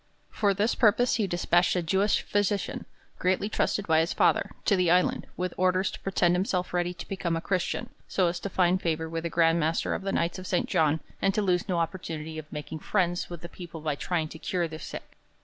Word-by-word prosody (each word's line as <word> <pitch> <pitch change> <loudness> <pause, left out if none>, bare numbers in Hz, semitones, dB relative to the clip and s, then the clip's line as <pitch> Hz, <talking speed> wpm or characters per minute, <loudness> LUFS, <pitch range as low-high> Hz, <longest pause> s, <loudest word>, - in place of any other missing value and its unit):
For 200 -2 +1
this 210 +4 +2
purpose 235 +1 +3
he 210 -4 +1
despatched 175 0 +2
a 180 - 0
Jewish 195 +5 +2
physician 205 -1 -1 0.3
greatly 185 +3 +1
trusted 205 -1 0
by 160 -3 +4
his 165 +2 +1
father, - - +3 0.2
to 200 - +4
the 180 -2 +2
island, 180 +1 +2
with 180 -1 -2
orders 185 +1 +2
to - - -8
pretend 180 -2 +2
himself 180 -1 -1
ready 175 0 +1
to 180 - -9
become 180 -3 -2
a - - -1
Christian 180 +1 -1 0.2
so 185 - +1
as 170 0 0
to 200 - -4
find 185 0 +2
favour 160 -1 -1
with 165 +1 -4
the - - 0
Grand 165 0 +3
Master 160 +1 0
of - - -3
the 195 0 -2
Knights 170 +1 0
of 185 - -7
St. 180 - 0
John, 155 0 +2 0.2
and 195 0 +2
to 215 - +1
lose 180 0 +1
no 180 - +1
opportunity 160 -2 -3
of 155 -1 -11
making 150 +1 -6
friends 175 0 0
with 175 -2 -7
the 170 - -7
people 170 -1 -9
by 150 -1 -1
trying 160 +2 -1
to 160 - -10
cure 175 0 -1
their 155 -1 -8
sick. - - -9
175 Hz, 225 wpm, -28 LUFS, 165-190 Hz, 0.3 s, by